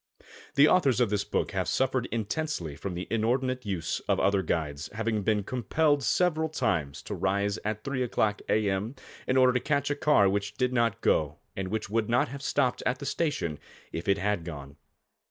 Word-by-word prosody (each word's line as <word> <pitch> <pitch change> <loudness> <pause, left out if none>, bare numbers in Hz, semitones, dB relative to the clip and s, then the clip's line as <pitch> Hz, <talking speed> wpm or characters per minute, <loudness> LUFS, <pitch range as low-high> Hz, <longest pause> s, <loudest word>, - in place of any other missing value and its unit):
The 140 +2 +7
authors 140 -9 +3
of 120 -4 +2
this 100 -1 +1
book - - -1
have 95 -3 -1
suffered 130 +7 +1
intensely 110 - -3
from 95 +2 -5
the 90 - -5
inordinate 125 +2 0
use 90 -5 -2
of - - +3
other 100 -1 +3
guides, 80 -4 -2
having 110 0 -1
been 105 0 +1
compelled 145 +6 +1
several 160 +1 +1
times 80 - -1
to - - -5
rise 100 +1 0
at 110 0 -3
3 135 -2 -2
o'clock 110 -4 0
a. 110 -1 +2
m., 100 +6 -1 0.3
in 130 - +2
order 130 -1 +5
to 125 - +2
catch 140 +1 0
a - - +1
car 145 -9 +4
which 100 +1 -1
did 125 +1 0
not 115 -2 +1
go 75 -1 +2 0.2
and 95 -1 -3
which 105 0 -3
would 110 0 0
not 120 +1 +2
have 140 +2 -7
stopped 130 -2 +1
at 125 0 0
the 140 - -7
station 140 - -1 0.3
if 85 - -5
it 100 0 +3
had 100 -3 0
gone. 70 -4 -8
110 Hz, 195 wpm, -28 LUFS, 95-130 Hz, 0.3 s, The